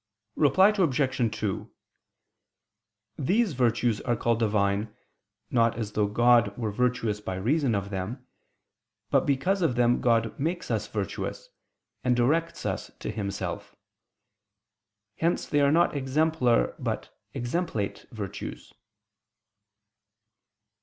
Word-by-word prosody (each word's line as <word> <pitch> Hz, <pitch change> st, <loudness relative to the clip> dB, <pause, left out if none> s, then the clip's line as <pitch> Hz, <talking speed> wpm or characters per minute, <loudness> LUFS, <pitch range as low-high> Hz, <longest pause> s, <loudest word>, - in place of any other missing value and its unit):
Reply 175 Hz, +7 st, +5 dB
Obj. 135 Hz, -, +1 dB
2: 105 Hz, -3 st, -3 dB, 1.5 s
These 190 Hz, -, +2 dB
virtues 120 Hz, -3 st, +1 dB
are 120 Hz, -2 st, 0 dB
called 115 Hz, 0 st, 0 dB
Divine, 105 Hz, -1 st, 0 dB, 0.6 s
not 115 Hz, -2 st, +2 dB
as 110 Hz, -3 st, -3 dB
though 105 Hz, 0 st, +1 dB
God 115 Hz, -1 st, +3 dB
were 110 Hz, -3 st, -2 dB
virtuous 115 Hz, -2 st, 0 dB
by 95 Hz, -3 st, -4 dB
reason 125 Hz, -, +1 dB
of 100 Hz, 0 st, -3 dB
them, 105 Hz, +7 st, -4 dB, 0.9 s
but 135 Hz, 0 st, +3 dB
because 160 Hz, +8 st, +1 dB
of 160 Hz, -8 st, +2 dB
them 120 Hz, 0 st, +3 dB
God 115 Hz, -2 st, +1 dB
makes 170 Hz, +5 st, -2 dB
us -, -, -1 dB
virtuous, -, -, -4 dB, 0.5 s
and 125 Hz, -1 st, +3 dB
directs 160 Hz, +8 st, +1 dB
us -, -, -3 dB
to -, -, -4 dB
Himself. 100 Hz, -4 st, -4 dB, 1.4 s
Hence 170 Hz, +2 st, 0 dB
they 145 Hz, -, +1 dB
are 140 Hz, 0 st, +4 dB
not 170 Hz, 0 st, +3 dB
exemplar 135 Hz, -2 st, +2 dB
but -, -, -4 dB, 0.2 s
exemplate 120 Hz, -, -2 dB
virtues. 105 Hz, -5 st, -7 dB
120 Hz, 110 wpm, -27 LUFS, 105-145 Hz, 1.5 s, Reply